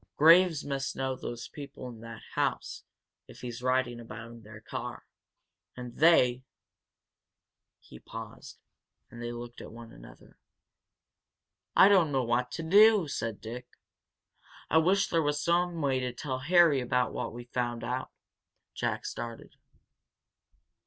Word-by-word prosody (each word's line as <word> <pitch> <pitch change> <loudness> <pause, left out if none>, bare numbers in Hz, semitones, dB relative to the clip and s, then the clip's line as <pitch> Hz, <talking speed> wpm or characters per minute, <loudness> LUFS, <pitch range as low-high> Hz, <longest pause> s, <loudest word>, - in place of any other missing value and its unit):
"Graves 165 0 +6
must 135 -1 -3
know 130 -1 -2
those 120 -2 -6
people 140 -3 -9
in 120 -3 -10
that 115 0 -10
house, - - -2 0.4
if - - -14
he's 120 -1 -6
riding 130 -1 0
about 115 0 -9
in 115 0 -12
their 105 0 -12
car. 110 - -7 0.7
And 125 -1 -8
they 130 -6 +5 0.7
" - - -61
He - - -12
paused, - - -10 0.5
and 115 - -10
they 120 0 -4
looked 120 0 -8
at - - -10
one 115 0 -11
another. - - -16 1.4
"I 190 - +8
don't 185 -7 +4
know 135 -2 +1
what 120 +1 0
to 165 - -4
do!" 205 +1 +6
said 115 -6 -4
Dick. 120 +3 -7 1.0
"I 160 - +6
wish 190 +4 +3
there 165 - +1
was 145 -1 0
some 170 +2 +1
way 135 -2 +1
to 125 -1 -2
tell 130 0 -4
Harry 160 -1 +4
about 125 0 0
what - - -3
we've 120 +1 -10
found 120 -1 -2
out," 125 +1 -3 0.6
Jack - - -2
started. 115 -1 -7
125 Hz, 145 wpm, -29 LUFS, 120-160 Hz, 1.4 s, I